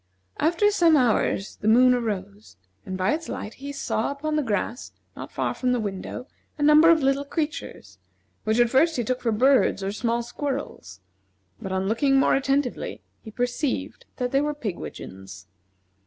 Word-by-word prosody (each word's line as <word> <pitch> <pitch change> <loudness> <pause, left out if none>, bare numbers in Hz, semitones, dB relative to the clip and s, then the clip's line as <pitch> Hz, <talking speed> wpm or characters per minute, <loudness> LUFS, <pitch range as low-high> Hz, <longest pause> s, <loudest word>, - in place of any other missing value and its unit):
After 345 +6 +3
some 335 -6 +4
hours 220 -5 +1
the 210 - -4
moon 250 +3 +6
arose, 185 - -4 0.3
and 185 - -4
by 185 +8 +1
its 320 +1 -4
light 210 - -5
he 280 +1 -5
saw 250 -5 -2
upon 300 +2 -3
the 305 - +2
grass, 230 0 -3 0.2
not - - -8
far - - -1
from 250 -1 0
his 235 - -2
window, 200 +5 -5 0.3
a 295 - -2
number 300 +2 +7
of 325 -4 +4
little 275 +1 +2
creatures, 285 - -5 0.4
which 220 +2 +1
at 240 -1 +4
first 320 +5 +3
he 240 - 0
took 255 +3 -2
for 230 - 0
birds 255 -3 +3
or 195 - -1
small 235 +2 -1
squirrels; 245 - -5 0.6
but 190 - -5
on 190 0 -1
looking 270 +5 +3
more - - +3
attentively 275 -1 -1 0.2
he 220 - -10
perceived 245 +5 -3
that 250 -1 -2
they 275 - +3
were 295 0 -1
pigwidgeons. 95 - -7
250 Hz, 170 wpm, -25 LUFS, 210-285 Hz, 0.6 s, number